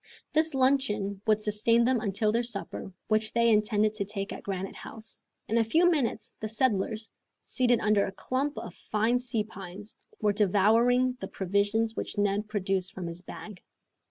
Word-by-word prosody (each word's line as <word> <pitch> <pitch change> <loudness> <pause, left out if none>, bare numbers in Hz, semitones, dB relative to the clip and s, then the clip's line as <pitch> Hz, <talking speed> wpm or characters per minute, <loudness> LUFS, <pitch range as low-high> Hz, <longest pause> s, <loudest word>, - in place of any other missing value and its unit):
This 315 -1 +2
luncheon 215 -7 +1
would 215 0 +3
sustain 230 +3 +3
them 255 -1 +2
until 210 0 0
their 230 +2 +2
supper, 215 -4 -5 0.2
which 215 0 +1
they 235 0 +4
intended 210 0 +2
to 215 -1 -2
take 195 0 -4
at - - -8
Granite 195 -1 -4
House. 220 -1 -9 0.3
In 230 +2 +2
a - - +4
few 325 +11 +3
minutes 255 -8 -1
the 215 - -3
settlers, 220 -1 0 0.3
seated 245 -2 +2
under 210 -1 +3
a - - -5
clump 265 +8 -2
of 175 - -6
fine 220 +6 0
sea 240 -3 -1
pines, 200 0 -9 0.2
were 210 -1 +2
devouring 225 +6 +3
the 195 - -5
provisions 205 +5 0
which - - -5
Neb 205 +1 +1
produced 195 -3 -1
from 185 - -5
his 170 +1 -6
bag. 190 +1 -10
215 Hz, 170 wpm, -28 LUFS, 200-235 Hz, 0.3 s, they